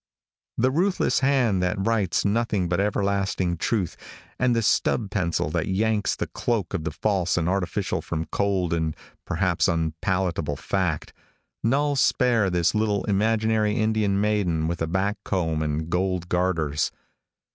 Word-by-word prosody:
The 130 +3 +2
ruthless 180 +7 +1
hand 130 -8 +2
that 90 +1 0
writes 105 -6 +1
nothing 105 -3 +1
but 90 +1 0
everlasting 100 -3 0
truth, 95 0 -1 0.4
and 125 -1 +2
the 115 - +1
stub 105 0 +1
pencil 85 -6 -1
that 85 -1 -1
yanks 105 +2 +1
the - - -2
cloak 110 -8 -2
of 85 -5 -2
the - - 0
false 95 -5 0
and 85 -1 0
artificial 95 +1 -1
from 80 +1 -3
cold 95 -4 0
and 80 -2 -1 0.3
perhaps - - +1
unpalatable 85 -1 -1
fact, 90 -2 -2 0.5
null 145 +5 +2
spare 125 -6 +3
this 85 -2 +1
little 105 -2 +1
imaginary 110 +1 +1
Indian 110 -3 +1
maiden 100 -7 +1
with 85 0 -3
a 80 - 0
back 95 +5 0
comb 80 -5 -1
and 75 +1 -2
gold 90 0 -1
garters. 80 -5 0
95 Hz, 145 wpm, -25 LUFS, 85-110 Hz, 0.5 s, spare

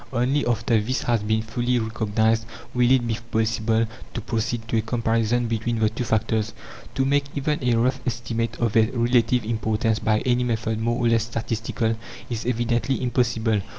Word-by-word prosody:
Only 130 +3 +1
after 115 -1 +2
this 125 +5 -2
has 120 -3 +1
been 110 +1 0
fully 120 +2 0
recognized 110 0 0 0.3
will 125 -1 +3
it 130 -2 +4
be 115 0 -1
possible 110 0 +1 0.3
to 120 - -2
proceed 115 0 -2
to 115 - +1
a - - +3
comparison 115 +1 0
between 115 +1 -1
the 110 -1 +3
two 115 +3 -4
factors. 110 0 0 0.4
To 135 - +2
make 140 +1 +2
even 145 0 -1
a 120 -1 +3
rough 130 +3 +1
estimate 115 -1 -2
of 115 -3 +1
their 110 0 +4
relative 120 0 +2
importance 110 0 0
by 110 -1 +1
any 125 -1 +1
method 110 -2 -1
more 120 +1 0
or - - +5
less 115 -1 +3
statistical, 115 0 -2 0.4
is 115 0 -3
evidently 120 +1 0
impossible. 115 -4 +1
115 Hz, 175 wpm, -24 LUFS, 110-120 Hz, 0.4 s, or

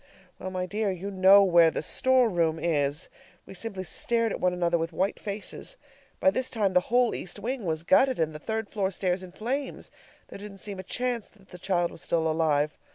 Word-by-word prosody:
Well, 185 - -5
my 185 -1 -3
dear, 210 +3 -1
you 190 +2 -4
know 195 +1 +7
where 170 -3 +6
the 160 - -3
store 260 +7 +2
room 165 -5 +1
is! 150 -1 -1 0.4
We - - -11
simply 195 -1 -5
stared 230 +4 0
at - - -4
one 180 - +2
another 175 -1 0
with 165 +1 -2
white 190 +5 -1
faces. 210 - -7 0.4
By 285 - +4
this 260 -1 -2
time 210 -6 0
the 180 - +6
whole 245 0 +3
east 180 - -4
wing 235 +2 -4
was 160 -1 -2
gutted 260 +8 +3
and 160 -1 0
the 150 - -7
third 220 +5 -3
floor 200 -3 -1
stairs 185 -1 -1
in 185 -1 -10
flames. 260 +8 -4 0.4
There - - -9
didn't 200 -1 -9
seem 195 0 -6
a - - -5
chance 245 +2 -2
that 195 -2 -24
the 180 - -11
child 175 -2 0
was - - -9
still 165 -2 0
alive. 155 -2 +1
190 Hz, 215 wpm, -27 LUFS, 170-220 Hz, 0.4 s, know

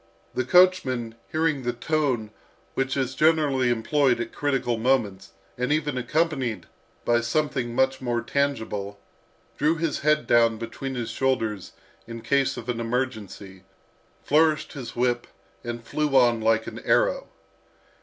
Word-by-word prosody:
The 130 - 0
coachman, 130 -9 +3 0.2
hearing 155 -3 +1
the 120 -1 -2
tone 125 -4 -1 0.4
which 135 +1 -1
is 130 -1 -1
generally 145 -4 +2
employed 120 +2 +2
at 120 -1 -4
critical 135 -5 0
moments, 110 -7 0 0.3
and 125 +3 0
even 150 -2 0
accompanied 130 - -1 0.4
by 120 0 +3
something 125 -1 -1
much 130 +1 +1
more 120 -2 -1
tangible, 110 -8 -2 0.6
drew 155 +3 +3
his 165 -2 -2
head 150 +1 +2
down 115 -1 +4
between 125 +4 -6
his 120 -2 -3
shoulders 110 -7 -1 0.3
in 115 0 -7
case 140 -2 +1
of 120 -1 -7
an 120 -2 -2
emergency, 110 -6 -4 0.6
flourished 155 +1 +2
his 130 -5 -7
whip, 120 0 0 0.4
and 120 0 -5
flew 150 0 -1
on 120 -3 +4
like 110 0 +2
an - - -7
arrow. - - +1
130 Hz, 135 wpm, -25 LUFS, 115-145 Hz, 0.6 s, down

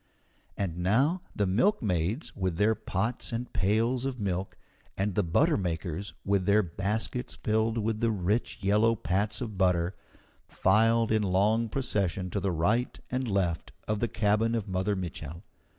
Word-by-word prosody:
And 90 -4 -2
now 130 - +2
the 100 - +1
milkmaids 105 - 0
with 95 -3 -2
their 105 +3 +4
pots 110 +3 -2
and 120 +1 -4
pails 115 +6 +1
of 135 -2 -3
milk, 95 -2 -2 0.4
and 100 +1 0
the 105 - +2
buttermakers 90 - 0
with 100 -2 +1
their 105 +1 +5
baskets 105 +7 -2
filled 110 +1 0
with 110 0 -1
the 115 - +2
rich 105 +2 -1
yellow 105 +4 +3
pats 100 +3 -1
of 110 -6 -5
butter, 90 -1 +2 0.5
filed 115 +3 +3
in 110 -1 +3
long 105 +4 +2
procession 100 -8 -1
to 100 - -1
the 95 0 0
right 105 +10 0
and 130 0 -1
left 90 -5 -1
of 105 -1 0
the 120 - +1
cabin 110 +2 +1
of 110 -4 -2
Mother 95 +2 0
Mitchel. 85 -3 -6
105 Hz, 150 wpm, -29 LUFS, 95-115 Hz, 0.5 s, their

